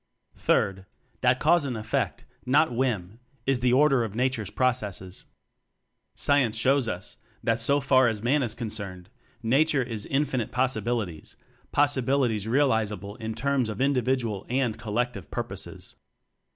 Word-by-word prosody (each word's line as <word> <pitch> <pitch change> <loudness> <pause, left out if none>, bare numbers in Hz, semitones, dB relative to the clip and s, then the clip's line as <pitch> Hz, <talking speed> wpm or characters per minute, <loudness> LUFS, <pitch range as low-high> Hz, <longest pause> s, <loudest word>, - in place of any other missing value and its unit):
Third: 95 0 +1 0.3
That 125 0 +3
cause 165 +1 +4
and 130 -4 -3
effect, 110 +1 -2 0.2
not 135 +1 +3
whim, 115 -5 -1 0.3
is 135 -2 +2
the 125 0 +2
order 135 -1 +4
of 110 -2 -5
Nature's 125 -4 0
pro 130 +4 +2
cesses. 100 -6 -5 0.9
Science 130 -6 +2
shows 130 +2 +3
us 90 -4 -5 0.3
that, 115 0 +1
so 140 +5 +3
far 130 -2 +4
as 110 -2 -2
Man 140 +5 +2
is 120 -4 -2
concerned, 100 -5 -5 0.3
Nature 135 +4 +3
is 115 -4 -5
infinite 135 -4 -1
poten 125 -2 +1
tialities; 105 -8 -3 0.4
potentialities 130 -6 +1
realizable 110 -6 +1
in 110 -2 -5
terms 140 -4 0
of 105 - -5
individual 125 -6 0
and 125 -3 0
collective 115 - -3
pur - - -2
poses. - - -8
120 Hz, 140 wpm, -26 LUFS, 110-135 Hz, 0.9 s, cause